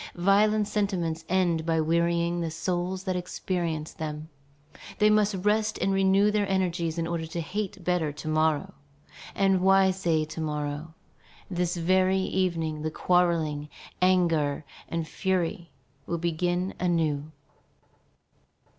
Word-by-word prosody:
Violent 205 +3 +3
sentiments 175 -7 -1
end 175 -3 +2
by 165 0 +1
wearying 170 +2 +1
the 165 - -1
souls 180 +3 -2
that 185 -2 -1
experience 175 -3 -3
them. 155 0 -6 0.7
They 210 0 +4
must 210 -1 +3
rest 215 +1 +2
and 195 - 0
renew 195 +2 +4
their 205 -1 0
energies 175 -3 0
in 165 - 0
order 165 -1 -3
to 165 +2 -5
hate 190 +3 -4
better 175 -4 0
to 150 +2 -9
morrow. 155 -1 +1 0.6
And 195 -2 +3
why 195 0 +5
say 170 -4 0
to 160 +1 -7
morrow? 150 +1 -4 0.6
This 175 -1 0
very 185 +2 +2
evening 170 -5 -1
the 155 - -1
quarrelling, 160 -4 +1 0.3
anger, 165 -6 +2 0.2
and 165 -1 -2
fury 175 -2 -1 0.4
will 170 - -1
begin 175 +2 -1
anew. 160 -4 0
175 Hz, 130 wpm, -27 LUFS, 160-190 Hz, 0.7 s, why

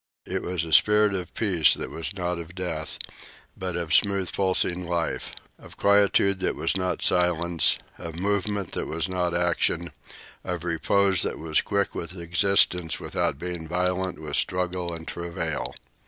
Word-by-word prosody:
It - - -3
was 90 -2 -2
a 80 - -4
spirit 105 -1 +6
of 90 -2 -4
peace 90 -9 +3
that - - -6
was 80 +2 -3
not 90 -2 -2
of 85 +1 -9
death, 85 -4 -4 0.6
but 90 -2 -4
of 85 -2 -1
smooth 100 -1 +3
pulsing 90 -2 +1
life, 85 -1 -2 0.2
of - - -14
quietude 100 -1 +3
that - - -1
was 80 - 0
not 90 -1 -1
silence, 85 -2 +3 0.2
of 85 -1 -7
movement 100 -1 -1
that - - -3
was 80 +1 -2
not 90 -2 -1
action, 85 0 0 0.5
of 90 -2 -4
repose 95 +2 +2
that - - -1
was 80 -1 +1
quick 100 -1 -1
with 85 +2 -5
existence 85 -1 +2
without - - -1
being 85 0 -5
violent 90 +1 -1
with 75 -1 -3
struggle 90 +1 -1
and 80 -1 -8
travail. 85 -3 -4
90 Hz, 155 wpm, -25 LUFS, 85-95 Hz, 0.6 s, spirit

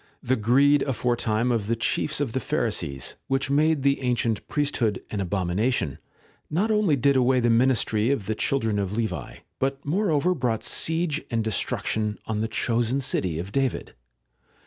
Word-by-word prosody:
The 130 - +2
greed 135 +6 +4
aforetime 120 -2 0
of 110 -4 -1
the 115 - +1
chiefs 115 +6 0
of 135 -6 -2
the 130 - 0
Pharisees, 90 - -2
which 135 +1 0
made 150 0 +2
the 140 0 +2
ancient 120 -4 -1
priesthood 130 -8 0
an 105 - -2
abomi 90 -2 -1
nation, 110 - 0 0.5
not 200 +8 +1
only 210 -8 +3
did 140 +2 +2
away 130 0 +3
the 120 -1 +2
ministry 115 -2 +2
of 135 -8 0
the 110 - -1
children 110 -3 0
of 100 +1 -2
Levi, 90 - -3 0.2
but 135 +1 -2
moreover 175 0 +1
brought 125 -8 -1
siege 160 -1 0
and 115 -1 0
destruction 110 0 -1
on 110 -1 -2
the 110 - 0
chosen 120 +3 0
city 95 - -1
of 90 +4 -5
David. 135 0 -1
120 Hz, 165 wpm, -25 LUFS, 110-140 Hz, 0.5 s, greed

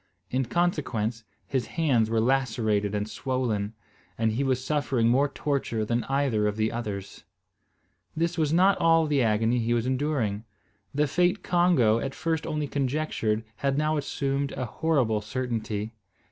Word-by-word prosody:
In 130 +1 +1
consequence, 120 -7 -1 0.2
his 130 -2 -2
hands 130 -9 +3
were 115 0 +1
lacerated 110 -5 +1
and 105 0 -1
swollen, 115 -5 -2 0.4
and 110 -1 +1
he 120 +6 -1
was 130 -1 0
suffering 135 -5 +1
more 135 +4 +3
torture 135 -7 -1
than 115 +2 -1
either 135 -6 +1
of 105 0 -2
the 110 0 +1
others. 100 -4 -5 0.9
This 170 +2 0
was 155 -4 +1
not 185 +4 +4
all 165 -1 +4
the 145 -3 +2
agony 115 +1 +2
he 120 +1 +1
was 115 0 0
enduring. 130 -6 -1 0.5
The 145 +1 +1
fate 180 +7 +1
Congo 170 -11 +3
at 135 +2 -4
first 160 -1 -2
only 150 -2 -2
conjectured 135 -6 -1
had 140 0 0
now 155 +1 +1
assumed 140 -1 -1
a 130 - -3
horrible 125 -5 +1
certainty. 110 -2 -3
130 Hz, 150 wpm, -27 LUFS, 110-150 Hz, 0.9 s, not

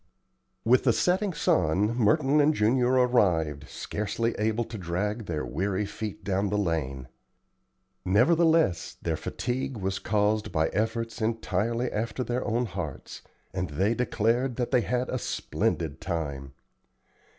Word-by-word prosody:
With 125 +2 +5
the 120 - +5
setting 185 - +1
sun 95 - +1
Merton 135 +6 +3
and 150 +1 +3
Junior 120 +4 +3
arrived, 90 - +2
scarcely 115 +3 -2
able 110 +2 +1
to 115 0 -9
drag 100 +5 -2
their 80 -3 -2
weary 95 +5 -1
feet 105 0 -6
down 100 +1 0
the 105 - 0
lane. 70 -9 -2 1.0
Nevertheless 160 - +3
their - - 0
fatigue 130 +1 -3
was 95 -1 -2
caused 105 0 +1
by 80 -1 +1
efforts 115 +2 -2
entirely 115 +2 -1
after 115 +3 -2
their 125 +1 -2
own 120 +3 0
hearts, 90 - -6 0.3
and 95 -2 -2
they 95 +10 +1
declared 120 +1 0
that 120 -1 -2
they 125 - +4
had 125 +1 0
had 130 - -5
a 130 - -1
"splendid 80 -8 -2
time." 70 -6 -4
110 Hz, 140 wpm, -27 LUFS, 90-120 Hz, 1.0 s, With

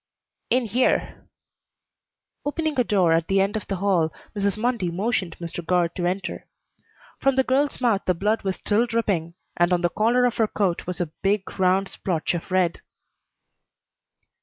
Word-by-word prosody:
"In 250 0 +2
here." 235 +4 0 1.2
Opening 305 -1 -1
a - - +5
door 185 -7 +3
at 165 0 +1
the 195 0 +2
end 195 +2 +1
of 220 - -4
the 195 - -2
hall, 180 -4 +1 0.2
Mrs. 200 -1 0
Mundy 230 -5 0
motioned 185 -1 -1
Mr. 170 0 -6
Guard 175 0 +1
to 175 -2 -1
enter. 190 +1 -3 0.7
From 275 -1 +2
the 265 - +4
girl's 275 +3 +1
mouth 230 -6 +2
the 180 - +3
blood 210 +6 0
was 190 -1 -2
still 220 +3 +1
dripping, 195 -8 -1 0.2
and 175 +1 +3
on 175 -1 +2
the 175 - +2
collar 235 +7 +2
of 245 - 0
her 225 - +3
coat 190 -6 -1
was 180 +1 -4
a 165 -3 -3
big 195 0 -1
round 190 +1 +3
splotch 175 -5 -2
of 175 +1 -5
red. 185 -2 +1
195 Hz, 170 wpm, -24 LUFS, 175-230 Hz, 1.2 s, a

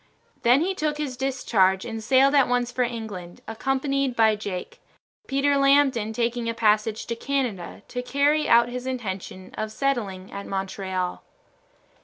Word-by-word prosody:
Then 245 +4 +5
he 375 +3 0
took 305 -4 -2
his 290 -4 -3
discharge 220 -8 +1
and 225 -2 -5
sailed 270 +4 +4
at 280 -2 +5
once 245 0 0
for 250 - -2
England, 220 -8 -4
accompanied 270 +3 -1
by 220 -2 +4
Jake; 200 -4 -6 0.5
Peter 280 +1 +2
Lambton 275 -5 +3
taking 235 +1 -1
a 230 - -3
passage 215 -1 +1
to 235 - -3
Canada 230 -9 -3
to 245 - -3
carry 285 +4 +1
out 235 0 +6
his 250 +1 -5
intention 190 -6 -5
of 215 0 -3
settling 215 -8 -2
at 200 0 -7
Montreal. 190 -1 -3
235 Hz, 150 wpm, -25 LUFS, 210-270 Hz, 0.5 s, out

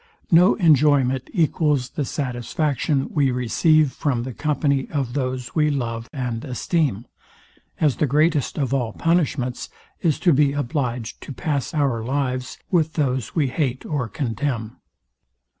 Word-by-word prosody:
No 180 +4 +6
enjoyment 145 - +3
equals 150 - +1
the 150 -6 -2
satisfaction 135 +2 -1
we 140 -3 +3
receive 130 +5 +2
from 130 -5 -1
the 130 0 -6
company 140 -1 0
of 135 -5 -2
those 130 -3 -3
we 150 -2 +2
love 115 -5 -3
and 125 -5 -3
esteem; 130 - -1 0.7
as 150 -5 +2
the 150 - +1
greatest 150 +1 +1
of 135 -3 -1
all 120 -5 -1
punishments 145 -7 0 0.3
is 160 -6 +2
to 175 - +4
be 140 0 +3
obliged 125 -4 -3
to - - -8
pass 140 -1 -2
our 135 -7 +1
lives 130 0 -2
with 160 -3 +2
those 130 -6 -1
we 145 -5 +2
hate 130 -2 -2
or 140 -7 -2
contemn. 120 -4 -3
140 Hz, 140 wpm, -22 LUFS, 125-150 Hz, 0.7 s, No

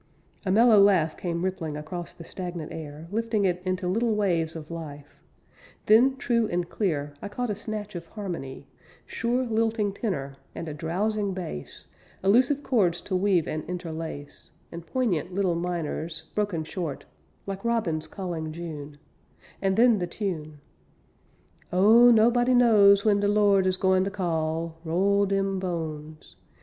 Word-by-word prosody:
A - - +2
mellow 220 0 +6
laugh 180 -6 +4
came 170 0 -3
rippling 165 -5 -3
Across 170 +3 -6
the 170 - -11
stagnant 175 -2 -6
air, 155 0 -8
Lifting 225 -1 0
it 180 -1 0
into 185 0 -2
little 225 +4 +1
waves 170 -6 0
of 160 0 -8
life. 145 -3 -9 0.6
Then, 250 +5 +5
true 235 -3 +1
and 175 -2 -2
clear, 150 -8 -2
I - - -5
caught 245 +2 -3
a - - -2
snatch 210 0 -5
of 170 -2 -7
harmony; 170 -11 -6 0.4
Sure 245 +2 -1
lilting 225 -3 0
tenor, 140 - -4 0.2
and 165 - -5
a 155 - -4
drowsing 195 +6 -1
bass, 165 - -7 0.4
Elusive 255 +8 +3
chords 185 -9 +2
to 190 - -3
weave 185 -3 +2
and 155 - -3
interlace, 165 -4 -7 0.2
And 170 0 -9
poignant 190 - -1
little 190 -3 +1
minors, 165 -2 -4
broken 205 -6 -1
short, 160 -2 -5 0.4
Like 195 0 -5
robins 210 -10 0
calling 170 -5 -5
June 155 -3 -7 0.6
And 190 -1 +1
then 235 -2 +5
the 175 - -2
tune: 155 -7 -5 1.1
"Oh, 220 +7 +7
nobody 240 +2 +4
knows 205 -4 +6
when 205 -2 +4
de 205 - +1
Lord 205 -2 +4
is 185 0 +2
goin 185 0 +3
ter 195 - -1
call, 165 -3 -2
Roll 195 +4 +2
dem 195 -1 0
bones. 160 -4 -6
185 Hz, 150 wpm, -26 LUFS, 165-210 Hz, 1.1 s, Oh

